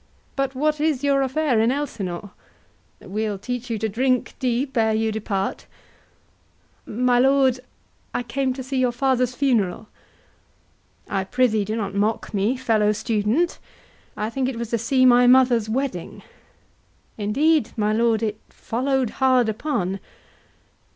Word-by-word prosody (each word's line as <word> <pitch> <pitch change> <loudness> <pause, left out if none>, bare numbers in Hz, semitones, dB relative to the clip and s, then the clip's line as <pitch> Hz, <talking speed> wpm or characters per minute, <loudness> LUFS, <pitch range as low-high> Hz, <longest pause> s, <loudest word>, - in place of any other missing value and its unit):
But 275 -1 -1
what 300 +2 0
is 300 -4 0
your 280 -1 +3
affair 270 -2 +1
in 225 +2 +3
Elsinore? 205 -10 -4 0.7
We'll 210 +1 -3
teach 245 +4 -5
you 230 - -1
to 220 +1 -1
drink 250 +4 0
deep 260 +1 -1
ere 220 -2 +2
you 220 0 0
depart. 200 -3 -3 1.2
HORATIO. 240 +4 -4
My 245 -1 +4
lord, 265 -1 +3 0.5
I 245 - -2
came 260 +2 -1
to 260 0 -6
see 260 +1 -2
your 250 -1 +2
father's 250 0 0
funeral. 225 -7 0 1.2
HAMLET. 195 - -1
I - - -3
prithee 220 -1 +1
do 215 +2 -3
not 200 -3 -3
mock 210 +3 -1
me, 210 +6 +1
fellow 215 -4 +2
student. 220 +9 0 0.6
I 215 +2 -2
think 260 +1 -1
it 255 - -5
was 235 -1 -5
to 235 - +1
see 255 +3 +2
my 245 0 +6
mother's 245 -3 +4
wedding. 245 -7 -3
HORATIO. - - -23 0.9
Indeed, 290 +10 +2
my 210 0 +1
lord, 230 0 +2
it 215 -1 -2
follow'd 260 0 -1
hard 255 -3 +4
upon. 205 -6 -2
240 Hz, 150 wpm, -23 LUFS, 215-265 Hz, 1.2 s, my